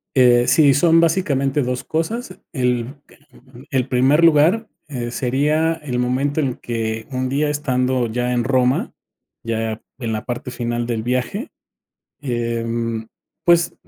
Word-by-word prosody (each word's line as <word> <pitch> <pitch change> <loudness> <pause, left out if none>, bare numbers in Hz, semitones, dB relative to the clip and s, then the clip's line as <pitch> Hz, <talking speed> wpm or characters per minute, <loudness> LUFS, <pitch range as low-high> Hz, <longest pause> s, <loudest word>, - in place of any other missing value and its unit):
Eh, 120 -2 +5
sí, 140 +2 +5
son 165 +3 +5
básicamente 150 -5 +1
2 125 0 -2
cosas, 185 +6 -3
el 125 0 -1 0.8
el 130 -2 +1
primer 135 +5 +3
lugar, 165 +8 +4 0.2
eh, 125 -5 -4
sería 145 +7 +1
el 150 -6 -5
momento 130 +4 0
en 135 -5 0
que 110 -1 -4
un 130 0 -2
día 145 +3 +1
estando 130 -3 0
ya 125 +2 -1
en 120 -1 +1
Roma, 130 0 +1 0.5
ya 115 -1 -2 0.2
en 115 -4 -3
la 110 - -3
parte 120 0 -5
final 120 -1 -2
del 115 -2 -2
viaje, 130 - -2 0.7
em, 115 -2 -2 0.4
pues, 170 0 +4
130 Hz, 135 wpm, -20 LUFS, 120-150 Hz, 0.8 s, Eh